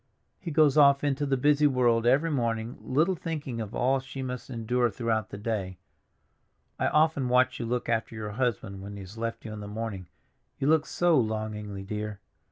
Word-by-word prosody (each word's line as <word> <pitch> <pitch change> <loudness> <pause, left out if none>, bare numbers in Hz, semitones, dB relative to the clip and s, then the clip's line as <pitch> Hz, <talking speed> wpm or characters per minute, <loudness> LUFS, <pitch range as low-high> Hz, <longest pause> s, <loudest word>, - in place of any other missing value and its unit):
He 175 - -6
goes 155 -2 +4
off 140 -1 +6
into 145 0 0
the 135 -1 +1
busy 150 +2 +4
world 120 -4 +2
every 145 +6 +3
morning, 115 -3 -1
little 155 +8 +2
thinking 150 -8 -4
of 110 -1 -6
all 135 +2 +2
she 130 0 -7
must 125 0 -5
endure 120 0 0
throughout 110 -1 -1
the - - -7
day. 100 -4 -3 1.0
I - - +2
often 150 -4 +2
watch 125 +1 +3
you 115 - -3
look 125 +1 -2
after 115 -1 -1
your 105 -1 -5
husband 110 -4 -2
when 100 +1 -7
he 100 - -7
has 95 +4 -10
left 115 0 -4
you 110 - -6
in 105 - -7
the 105 - -7
morning; 105 -4 -5 0.5
you - - -2
look 155 0 +3
so 175 -4 +3
longingly, 110 -3 -3
dear. 105 0 -5
120 Hz, 190 wpm, -28 LUFS, 110-140 Hz, 1.0 s, off